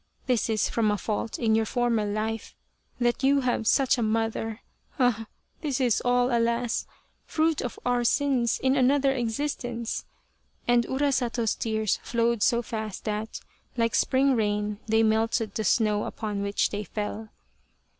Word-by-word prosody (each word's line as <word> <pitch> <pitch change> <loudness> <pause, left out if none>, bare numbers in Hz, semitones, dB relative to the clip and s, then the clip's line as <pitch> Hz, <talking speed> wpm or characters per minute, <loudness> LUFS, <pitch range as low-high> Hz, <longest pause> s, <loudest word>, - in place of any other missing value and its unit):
This 245 -3 +1
is 220 -1 +1
from 225 -2 +1
a 210 - +1
fault 215 +3 -3
in 225 -2 +1
your 220 0 +2
former 240 -3 +1
life 215 +2 -3 0.4
that 240 0 +1
you 275 +1 +4
have 245 -3 0
such 270 0 +3
a - - 0
mother 225 0 -1 0.4
ah! 240 -4 +1 0.3
this 285 -4 -1
is 245 -5 +2
all, 245 0 +2
alas, 235 0 0 0.4
fruit 315 -1 +1
of 245 - -5
our 245 -1 +2
sins 255 -2 +2
in 265 +1 +3
another 275 +1 +3
existence," 240 -1 -3 0.6
and 240 -1 +3
Urasato's 255 -4 0
tears 220 -2 -1
flowed 235 -1 0
so 235 +1 +3
fast 220 -3 -5
that, 215 +1 -3 0.4
like 230 -1 +1
spring 265 0 +3
rain, 210 -1 -1
they 220 +1 +3
melted 220 0 +1
the 220 - -2
snow 210 0 +2
upon 210 -3 -4
which 200 0 0
they 205 0 -3
fell. 210 +1 -5
230 Hz, 150 wpm, -26 LUFS, 220-250 Hz, 0.6 s, you